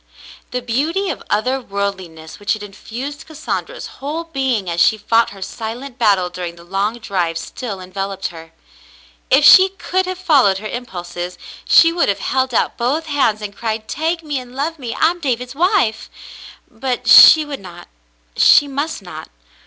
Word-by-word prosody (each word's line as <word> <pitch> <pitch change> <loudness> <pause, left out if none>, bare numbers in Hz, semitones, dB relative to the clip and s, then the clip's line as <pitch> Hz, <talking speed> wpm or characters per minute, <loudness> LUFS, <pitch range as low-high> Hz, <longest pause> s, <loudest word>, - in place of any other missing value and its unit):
The 250 0 -4
beauty 315 +12 -1
of - - -7
other 255 +6 0
worldliness 190 -7 -5
which 205 - 0
had 215 -1 -6
infused 240 +8 -8
Cassandra's 315 +10 -5 0.2
whole 305 +4 -3
being 265 - -2
as 170 0 -1
she 220 - +4
fought 225 +2 +2
her 195 -1 -9
silent 240 +6 -7
battle 200 -6 +3
during 175 -1 -6
the 170 - -15
long 195 +6 -2
drive, 180 -7 -2
still 205 +3 -6
enveloped 195 +1 -5
her. 165 -1 -12 0.8
If - - +4
she 375 +1 +8
could 375 -1 -2
have 370 0 -4
followed 275 - +3
her 215 +2 -6
impulses, 180 -6 -6 0.3
she 330 0 +6
would 340 -8 +1
have 200 - 0
held 260 -1 -1
out 230 - 0
both 275 +7 -1
hands 265 -8 0
and 205 -1 -6
cried: 220 -1 -4
"Take 330 +2 -2
me 295 -3 -3
and 250 0 -12
love 310 +4 -3
me. 240 -4 -5
I 320 - +3
am 350 - -9
David's 250 -5 -3
wife." 345 - +1 0.6
But 250 -2 -4
she 310 +6 +9
would 285 -2 -6
not 175 -2 -12 0.3
— - - -40
she 290 - +6
must 285 -3 -4
not. 160 -3 -9
235 Hz, 175 wpm, -18 LUFS, 195-290 Hz, 0.8 s, she